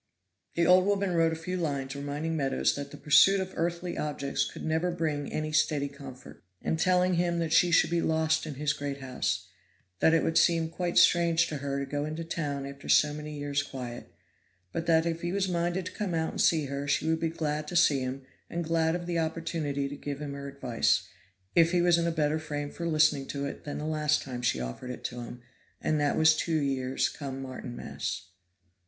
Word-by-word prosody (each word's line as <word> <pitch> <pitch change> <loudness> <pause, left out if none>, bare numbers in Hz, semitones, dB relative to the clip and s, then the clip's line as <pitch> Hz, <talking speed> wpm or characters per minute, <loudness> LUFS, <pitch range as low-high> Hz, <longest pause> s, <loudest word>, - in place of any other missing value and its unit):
The 170 - +3
old 185 +2 +6
woman 200 -2 +1
wrote 165 -1 +3
a - - -2
few 180 +3 -4
lines 140 -5 -2
reminding 145 +3 -3
Meadows 135 -3 +1
that 140 0 -5
the - - -10
pursuit 195 +6 +5
of 190 0 -4
earthly 170 +1 -2
objects 145 -2 -1
could - - -8
never 160 +3 +1
bring 155 -4 -2
any 155 0 -2
steady 150 -2 +2
comfort, 140 -2 -12 0.2
and 160 - -2
telling 180 +1 +3
him 170 0 +1
that 165 -2 -1
she 175 - +5
should 170 - +4
be 170 -1 +2
lost 160 0 +1
in 150 - -5
his 150 +2 0
great 145 -2 -4
house 130 -2 -2 0.5
that 160 - +5
it 165 - +2
would 165 - +3
seem 165 -2 +3
quite 175 +1 -2
strange 170 -1 +5
to 150 - -3
her 140 0 -3
to 140 - -2
go 145 +1 -2
into 155 +2 -4
the 165 - -14
town 145 -4 -2
after 140 0 -9
so 150 -1 +5
many 150 0 -6
years' 145 0 -1
quiet 125 -4 -7 0.6
but 165 +8 -4
that 160 -1 +4
if 165 0 -2
he 175 - -2
was 195 0 0
minded 175 +1 -1
to - - -5
come 195 -5 -3
out 160 0 0
and - - -2
see 160 -3 +3
her 140 +1 -4
she 145 - +1
would 160 0 +1
be 165 - 0
glad 155 -2 -2
to 175 - -6
see 155 -5 +5
him 130 +1 -4 0.3
and 170 0 -2
glad 165 0 +1
of 175 0 -4
the 170 -1 -1
opportunity 160 -3 -2
to 140 - -6
give 145 0 -5
him 145 -2 -5
her 140 0 -6
advice, 130 -4 0 0.5
if 170 +1 +4
he 175 - +4
was 175 -1 +4
in 170 - +1
a - - +1
better 155 -1 +1
frame 145 -2 -4
for 170 - -4
listening 150 -4 +3
to 140 0 -3
it 140 - -7
than 145 - -4
last 150 -1 +1
time 125 -3 -6
she 115 - +1
offered 60 - -5
it 125 - -7
to 120 0 -4
him, 120 +1 -9 0.4
and 155 - 0
that 145 -1 +1
was 160 0 +6
two 160 0 0
years 135 -2 0
come 135 -2 -6
Martinmas. 130 -2 -5
155 Hz, 220 wpm, -29 LUFS, 140-170 Hz, 0.6 s, old